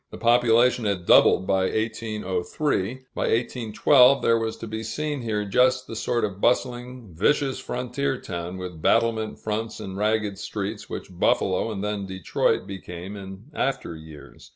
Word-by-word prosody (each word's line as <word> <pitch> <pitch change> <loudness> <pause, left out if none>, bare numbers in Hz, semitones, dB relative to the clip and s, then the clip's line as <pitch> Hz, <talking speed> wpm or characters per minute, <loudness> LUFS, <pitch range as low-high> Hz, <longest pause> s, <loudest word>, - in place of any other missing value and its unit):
The - - -9
population 120 0 +4
had 95 -4 -1
doubled 95 - +6
by 95 0 +2
1803. 110 - -2
By - - -4
1812 125 +3 +4
there 115 0 +4
was 110 -1 -3
to - - -7
be 110 0 -5
seen 145 +5 -3
here 105 -3 -2
just 125 +5 +3
the 115 - -8
sort 120 +1 0
of 100 -1 -7
bustling, 125 -3 -1
vicious 135 - +1
frontier 125 +2 -2
town, 85 0 -5
with 90 -3 -7
battlement 115 0 +1
fronts 110 +1 -4
and 95 -3 -6
ragged 105 -1 0
streets, 105 +1 -5
which - - -7
Buffalo 95 +4 +1
and 100 -2 -4
then 105 -2 -3
Detroit 95 -2 0
became 95 0 -8
in 100 +6 -10
after 135 - -2
years. 80 -3 -13
110 Hz, 155 wpm, -25 LUFS, 95-120 Hz, -, doubled